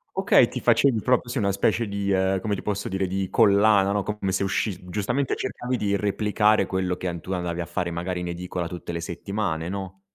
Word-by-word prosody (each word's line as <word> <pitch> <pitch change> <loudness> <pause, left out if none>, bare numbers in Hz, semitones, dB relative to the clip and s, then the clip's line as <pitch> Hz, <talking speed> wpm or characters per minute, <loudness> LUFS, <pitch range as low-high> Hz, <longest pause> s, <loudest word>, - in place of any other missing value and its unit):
Okay, - - +5
ti - - -5
facevi 125 -6 +3
proprio 125 +1 +2
sì 120 +2 -2
una 100 -2 +1
specie 105 +3 +1
di, 100 0 -2
ehm, 95 0 +2
come 105 +2 -2
ti 100 - -3
posso 105 -1 -3
dire, 95 0 -1
di 95 0 -2
collana, 100 -2 +4
no, 100 0 0
come 105 -2 -2
se 95 - 0
usci 95 0 -1
giustamente 120 +8 -1
cercavi 125 -1 -3
di 100 -4 0
replicare 105 +1 +2
quello 95 -1 -1
che 90 - -4
an 85 -1 -3
tu 95 - -8
andavi 90 -1 -2
a - - -3
fare 85 0 -2
magari 90 +2 -3
in 90 - -4
edicola 90 0 -4
tutte 85 0 -7
le 85 0 -4
settimane, 85 -1 -3
no? 95 -1 -6
95 Hz, 220 wpm, -25 LUFS, 90-105 Hz, -, Okay